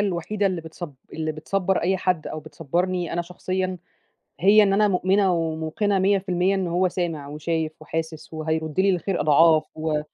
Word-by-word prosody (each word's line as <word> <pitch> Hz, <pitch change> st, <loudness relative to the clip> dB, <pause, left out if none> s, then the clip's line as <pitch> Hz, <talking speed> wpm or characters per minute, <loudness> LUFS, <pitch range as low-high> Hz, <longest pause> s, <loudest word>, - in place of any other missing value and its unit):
الوحيدة 200 Hz, +1 st, 0 dB
اللي 185 Hz, -3 st, -1 dB
بتصب 160 Hz, -1 st, -8 dB, 0.2 s
اللي 155 Hz, -1 st, -2 dB
بتصبّر 185 Hz, +5 st, -1 dB
أي 190 Hz, +3 st, +2 dB
حد 180 Hz, -3 st, -1 dB
أو 155 Hz, -, -5 dB
بتصبّرني 175 Hz, +4 st, -2 dB
أنا 175 Hz, -, -1 dB
شخصيًا 185 Hz, +1 st, -3 dB, 0.6 s
هي 205 Hz, +4 st, +7 dB
إن 200 Hz, -1 st, +3 dB
أنا 210 Hz, +1 st, +4 dB
مؤمنة 190 Hz, +1 st, +2 dB
وموقنة 165 Hz, +5 st, -1 dB
100% 190 Hz, -1 st, +2 dB
إن 190 Hz, -2 st, -1 dB
هو 180 Hz, +2 st, +2 dB
سامع 170 Hz, -5 st, -3 dB
وشايف 155 Hz, +1 st, -2 dB
وحاسس 160 Hz, 0 st, -5 dB
وهيرُد 160 Hz, +1 st, -2 dB
لي 195 Hz, +1 st, +4 dB
الخير 185 Hz, 0 st, -1 dB
أضعاف 155 Hz, +1 st, +5 dB
و 155 Hz, -1 st, -1 dB
175 Hz, 160 wpm, -24 LUFS, 160-190 Hz, 0.6 s, هي